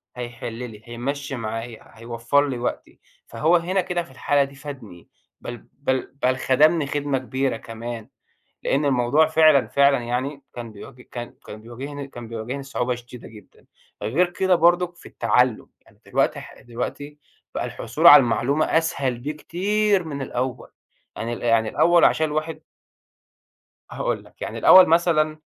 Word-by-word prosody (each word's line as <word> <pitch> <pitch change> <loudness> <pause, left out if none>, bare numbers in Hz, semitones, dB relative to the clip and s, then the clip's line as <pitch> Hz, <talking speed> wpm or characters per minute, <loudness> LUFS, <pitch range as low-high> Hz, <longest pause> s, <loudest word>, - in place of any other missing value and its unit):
هيحل 120 -1 -6
لي، 115 -3 -8
هيمشّي 135 +4 -4
معايا، 115 0 -7
هيوفّر 115 +5 0
لي 130 - -3
وقتي، 120 - -5 0.3
فهو 155 +10 +2
هنا 180 +3 +1
كده 175 -1 -2
في 135 - -17
الحالة 140 +2 +1
دي 140 0 -9
فادني، 130 - -10 0.3
بل 120 -1 -8
بل 130 -2 -2
بل 130 0 +2
خدمني 150 +4 +3
خدمة 145 -1 -1
كبيرة 130 -1 -2
كمان، 115 +1 -8 0.5
لأن 140 +2 +1
الموضوع 135 +3 +3
فعلًا 155 -5 +5
فعلًا 140 0 +4
يعني 130 +4 -3
كان 120 -2 -7
بي 125 +4 -13
كان 120 -1 -8
كان 105 +1 -10
بيواجهني 135 +4 -7
كان 120 -4 -10
بيواجهني 115 +5 -5
صعوبة 125 -2 -2
شديدة 120 0 -11
جدًا، 105 -2 -17 0.4
غير 155 +13 +1
كده 185 +1 +2
برضو 175 +1 +4
في 175 - -17
التعلم، 120 +1 +1
يعني 105 - -26
دلوقتي 135 +2 0
ح 140 - -13
دلوقتي 145 +5 -6 0.4
بقى - - -2
الحصول 160 +3 -1
على 145 -3 +11
المعلومة 125 +5 +1
أسهل 140 -6 0
بكتير 185 +8 0
من 140 -4 -5
الأول، 125 0 -4 0.5
يعني 115 +2 -4
ال 120 - -6
يعني 115 -2 +2
الأول 175 0 +4
عشان 160 - +3
الواحد 155 +1 -3 1.3
هاقول - - -2
لك، - - -22
يعني - - -5
الأول 185 -1 +8
مثلًا 155 -2 +2
135 Hz, 150 wpm, -23 LUFS, 120-155 Hz, 1.3 s, على